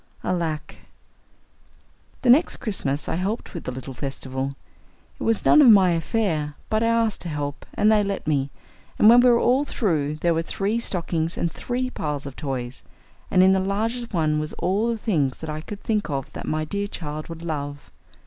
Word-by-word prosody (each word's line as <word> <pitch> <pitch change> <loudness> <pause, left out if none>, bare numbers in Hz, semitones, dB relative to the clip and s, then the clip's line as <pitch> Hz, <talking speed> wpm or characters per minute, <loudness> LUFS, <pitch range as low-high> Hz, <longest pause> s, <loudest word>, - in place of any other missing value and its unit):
Alack! 165 -4 -2 1.5
The 245 - +6
next 300 +8 +4
Christmas 150 -9 -1
I - - -1
helped 195 +7 -3
with 170 - -7
the - - -3
little 130 +1 -7
festival. 135 +1 -4 0.6
It - - -17
was 225 -2 +1
none 305 - +7
of 265 - +8
my 195 -4 +7
affair, 165 -3 -1 0.2
but 215 0 +2
I 230 - +2
asked 230 -2 +1
to 175 - -4
help, 145 -2 -4
and 215 - +4
they 215 -1 +4
let 200 -1 -3
me, 140 -3 0 0.5
and 210 - +5
when 240 +1 +8
we 250 0 +6
were 240 - +5
all 255 +4 +3
through 155 - -1
there 170 +2 +1
were 165 - 0
three 200 +6 -1
stockings 170 -6 -1
and 170 - -1
three 255 +6 -3
piles 150 - -3
of 140 -2 -7
toys, 130 -4 -5 0.5
and 185 - +5
in 190 +1 +6
the 190 - +3
largest 225 +5 -2
one 155 -5 +1
was 155 0 -3
all 200 +5 0
the 235 -1 -1
things 155 - 0
that 160 -1 -5
I 155 0 -4
could 200 +5 -8
think 215 -4 -1
of 135 -2 -4
that - - -7
my 155 0 -1
dear 200 +5 -2
child 155 -5 -6
would 165 0 -8
love. 145 -3 -5
170 Hz, 195 wpm, -24 LUFS, 150-215 Hz, 1.5 s, of